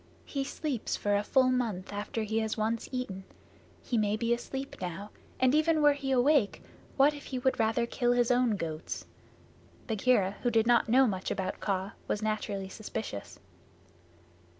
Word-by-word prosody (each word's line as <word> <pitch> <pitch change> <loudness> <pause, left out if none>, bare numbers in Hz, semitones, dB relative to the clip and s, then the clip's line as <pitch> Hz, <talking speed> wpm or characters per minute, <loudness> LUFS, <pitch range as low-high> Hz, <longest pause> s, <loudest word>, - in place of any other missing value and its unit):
"He 275 -2 -2
sleeps 270 -3 -3
for 205 0 0
a 205 - +2
full 255 +4 +3
month 220 -7 -2
after 205 +2 -3
he 220 +1 0
has 220 0 -2
once 220 +1 -1
eaten. 225 -7 -4 0.6
He 235 - 0
may 210 0 +1
be 235 +1 +1
asleep 270 +3 -5
now, 185 +3 -5 0.3
and 255 0 +4
even 315 +1 +3
were 295 -1 +6
he 280 -1 -5
awake 260 -3 +3 0.3
what 285 +2 +5
if 290 -1 -10
he 260 - -4
would 260 +1 0
rather 225 +1 +2
kill 245 0 +1
his 245 0 +2
own 245 -3 +3
goats?" 160 -4 -5 0.8
Bagheera, 215 -3 +2
who 245 - +2
did 225 -1 +3
not 235 -1 +4
know 260 +3 +6
much 190 -5 -2
about 190 - -3
Kaa, 195 0 -1 0.2
was 210 - -1
naturally 210 -2 -2
suspicious. 210 - -6
230 Hz, 170 wpm, -30 LUFS, 205-255 Hz, 0.8 s, were